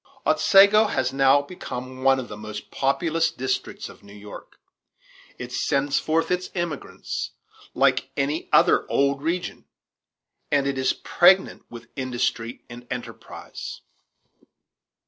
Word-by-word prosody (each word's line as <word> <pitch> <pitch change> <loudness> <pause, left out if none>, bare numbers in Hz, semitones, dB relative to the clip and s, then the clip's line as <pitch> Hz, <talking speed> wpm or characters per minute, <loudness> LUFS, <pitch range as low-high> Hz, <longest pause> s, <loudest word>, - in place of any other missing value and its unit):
Otsego 200 +2 +6
has 130 -9 -1
now 135 +1 +4
become 130 -5 -7
one 135 0 +4
of 125 - -6
the 105 - -8
most 105 0 -8
populous 160 +4 +1
districts 130 -3 -3
of - - -14
New 100 0 -15
York. 105 0 -12 0.8
It 125 0 -7
sends 140 +2 0
forth 160 +2 0
its 180 0 -1
emigrants 175 -5 -4 0.4
like - - +2
any 145 +3 -1
other - - +4
old 140 0 +1
region, 170 +4 -3 0.9
and 140 -1 +2
it 140 -1 -1
is 130 - +2
pregnant 185 +2 +3
with 120 0 -11
industry 120 -3 -2
and 120 +1 -11
enterprise. 125 -1 -8
135 Hz, 125 wpm, -24 LUFS, 125-165 Hz, 0.9 s, Otsego